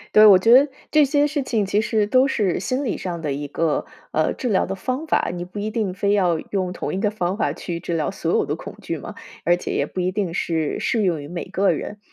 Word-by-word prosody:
对， 215 Hz, -, +9 dB
我 200 Hz, -3 st, +9 dB
觉 225 Hz, +5 st, +5 dB
得， 265 Hz, +3 st, +8 dB, 0.3 s
这 305 Hz, -1 st, +6 dB
些 290 Hz, +1 st, +3 dB
事 290 Hz, -1 st, -2 dB
情 225 Hz, -5 st, 0 dB
其 200 Hz, +2 st, +1 dB
实 215 Hz, -1 st, +1 dB
都 255 Hz, +4 st, +4 dB
是 210 Hz, -9 st, 0 dB
心 260 Hz, +6 st, -1 dB
理 225 Hz, -, -1 dB
上 175 Hz, -3 st, -5 dB
的 150 Hz, -3 st, -2 dB
一 145 Hz, +1 st, -5 dB
个， 160 Hz, +1 st, 0 dB, 0.3 s
呃， 155 Hz, -, +1 dB
治 255 Hz, -, -4 dB
疗 205 Hz, -5 st, +2 dB
的 -, -, -4 dB
方 255 Hz, +10 st, -3 dB
法， 315 Hz, -, +1 dB
你 175 Hz, 0 st, -4 dB
不 180 Hz, +3 st, -8 dB
一 210 Hz, +1 st, -2 dB
定 215 Hz, -4 st, -2 dB
非 200 Hz, +2 st, +1 dB
要 180 Hz, -5 st, +2 dB
用 185 Hz, -3 st, -1 dB
同 180 Hz, -, -4 dB
一 190 Hz, -, -2 dB
个 210 Hz, -2 st, +1 dB
方 185 Hz, -3 st, -1 dB
法 -, -, 0 dB
去 170 Hz, -2 st, -5 dB
治 170 Hz, -, -3 dB
疗 155 Hz, -, 0 dB
所 -, -, -2 dB
有 -, -, +2 dB
的 -, -, -2 dB
恐 -, -, -10 dB
惧 -, -, -4 dB
嘛， -, -, -8 dB, 0.3 s
而 175 Hz, +1 st, +3 dB
且 -, -, -5 dB
也 -, -, +1 dB
不 -, -, -7 dB
一 180 Hz, +1 st, 0 dB
定 190 Hz, -5 st, -2 dB
是 160 Hz, -3 st, -1 dB
适 225 Hz, -2 st, 0 dB
用 170 Hz, -6 st, 0 dB
于 145 Hz, -, -8 dB
每 170 Hz, +2 st, -5 dB
个 195 Hz, 0 st, +2 dB
人。 205 Hz, +6 st, -6 dB
195 Hz, 285 characters per minute, -22 LUFS, 175-225 Hz, 0.3 s, 对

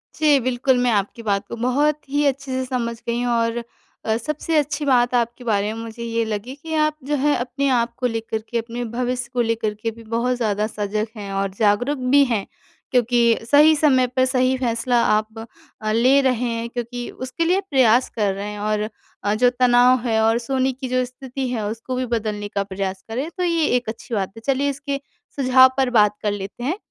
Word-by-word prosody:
जी, 300 Hz, -3 st, +4 dB
बिल्कुल 255 Hz, +1 st, +1 dB
मैं 245 Hz, -, +3 dB
आपकी 205 Hz, +2 st, -1 dB
बात 200 Hz, -2 st, 0 dB
को -, -, -6 dB
बहुत 285 Hz, +6 st, +1 dB
ही 290 Hz, +1 st, +1 dB
अच्छे 275 Hz, -1 st, -1 dB
से 260 Hz, 0 st, -1 dB
समझ 240 Hz, -2 st, -2 dB
गई 235 Hz, +1 st, 0 dB
हूँ 245 Hz, -1 st, 0 dB
और 230 Hz, 0 st, 0 dB, 0.4 s
अ, 220 Hz, -, +1 dB
सबसे 305 Hz, +6 st, -2 dB
अच्छी 295 Hz, 0 st, 0 dB
बात 250 Hz, -2 st, +3 dB
आपके 240 Hz, +1 st, -1 dB
बारे 210 Hz, -3 st, 0 dB
में 225 Hz, -, -6 dB
मुझे 230 Hz, +1 st, -8 dB
ये 230 Hz, 0 st, -1 dB
लगी 220 Hz, +4 st, -4 dB
कि 320 Hz, +3 st, -8 dB
आप 305 Hz, -1 st, +2 dB
जो 295 Hz, +1 st, 0 dB
है 295 Hz, 0 st, +3 dB
अपने 255 Hz, +3 st, -2 dB
आप 235 Hz, -2 st, +1 dB
को 250 Hz, -, 0 dB
लेकर 225 Hz, -1 st, -3 dB
के 240 Hz, -, -1 dB
अपने 230 Hz, +1 st, -4 dB
भविष्य 250 Hz, 0 st, -2 dB
को 245 Hz, -, +1 dB
लेकर 225 Hz, -2 st, -1 dB
के 225 Hz, -, -1 dB
भी 230 Hz, +1 st, -14 dB
बहुत 245 Hz, +2 st, +1 dB
ज़्यादा 210 Hz, -3 st, 0 dB
सज़ग 210 Hz, 0 st, -2 dB
हैं 200 Hz, -1 st, -6 dB
और 195 Hz, 0 st, 0 dB
जागरूक 225 Hz, +7 st, +2 dB, 0.2 s
भी 285 Hz, 0 st, +7 dB
हैं। 225 Hz, -6 st, -1 dB, 0.5 s
क्योंकि 240 Hz, -1 st, +3 dB
सही 300 Hz, +2 st, +7 dB
समय 270 Hz, -4 st, +3 dB
पर 255 Hz, +1 st, +1 dB
सही 255 Hz, 0 st, +2 dB
फैसला 240 Hz, -1 st, +1 dB
आप 215 Hz, +1 st, 0 dB, 0.4 s
अ, 215 Hz, 0 st, -1 dB
ले 250 Hz, +5 st, +4 dB
रहे 250 Hz, -3 st, +1 dB
हैं 230 Hz, 0 st, -3 dB
क्योंकि 240 Hz, 0 st, -5 dB
उसके 260 Hz, +6 st, -3 dB
लिए 365 Hz, +4 st, +2 dB
प्रयास 255 Hz, -3 st, +4 dB
कर 205 Hz, -3 st, +1 dB
रहे 200 Hz, +1 st, -5 dB
हैं 210 Hz, -, -7 dB
और 210 Hz, 0 st, -1 dB, 0.3 s
अ, 205 Hz, -, +1 dB
जो 245 Hz, +3 st, +4 dB
तनाव 250 Hz, 0 st, +4 dB
है 220 Hz, -1 st, +2 dB
और 225 Hz, +1 st, +3 dB
सोने 265 Hz, -1 st, +1 dB
की 260 Hz, +1 st, -6 dB
जो 255 Hz, 0 st, +1 dB
स्थिति 260 Hz, +1 st, -6 dB
है 225 Hz, -4 st, -2 dB
उसको 230 Hz, +4 st, -5 dB
भी 255 Hz, 0 st, -1 dB
बदलने 210 Hz, -2 st, -3 dB
का 200 Hz, -, +1 dB
प्रयास 190 Hz, -1 st, -4 dB
करें 260 Hz, +8 st, -3 dB
तो 365 Hz, -, -1 dB
ये 335 Hz, -3 st, +2 dB
एक 245 Hz, -2 st, -4 dB
अच्छी 230 Hz, +2 st, -8 dB
बात 195 Hz, -2 st, -1 dB
है। -, -, -9 dB
चलिए 275 Hz, +1 st, +1 dB
इसके 280 Hz, 0 st, -3 dB, 0.4 s
सुझाव 260 Hz, -1 st, +6 dB
पर 265 Hz, -2 st, +2 dB
बात 210 Hz, 0 st, +4 dB
कर 210 Hz, -, +1 dB
लेते 200 Hz, +4 st, -6 dB
हैं 310 Hz, +9 st, -1 dB
245 Hz, 215 wpm, -21 LUFS, 220-260 Hz, 0.5 s, भी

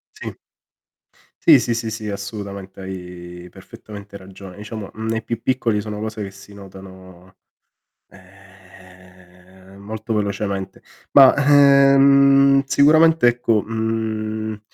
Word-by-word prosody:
Sì. -, -, -8 dB, 1.1 s
Sì, -, -, +7 dB
sì, 120 Hz, -, -2 dB
sì, 115 Hz, -1 st, -4 dB
sì, 110 Hz, -1 st, -6 dB
assolutamente, 100 Hz, -1 st, -8 dB
hai 90 Hz, -2 st, -10 dB
perfettamente 100 Hz, +1 st, -13 dB
ragione. 95 Hz, 0 st, -13 dB
Diciamo, 105 Hz, -1 st, -8 dB
mhmm, 110 Hz, +1 st, -7 dB
nei 115 Hz, 0 st, -3 dB
più 115 Hz, -1 st, -5 dB
piccoli 120 Hz, -5 st, -1 dB
sono 105 Hz, 0 st, -7 dB
cose 110 Hz, -1 st, -6 dB
che 100 Hz, -1 st, -6 dB
si 100 Hz, +1 st, -16 dB
notano, 95 Hz, -2 st, -15 dB, 0.7 s
ehm, 95 Hz, -1 st, -20 dB
molto 110 Hz, +3 st, -7 dB
velocemente. 100 Hz, -2 st, -4 dB, 0.3 s
Ma, 135 Hz, -2 st, +7 dB
ehm, 140 Hz, -1 st, +4 dB
sicuramente, 155 Hz, +1 st, +4 dB
ecco 120 Hz, -3 st, +1 dB
mhmm, 110 Hz, -1 st, -4 dB
105 Hz, 110 wpm, -19 LUFS, 95-115 Hz, 1.1 s, Sì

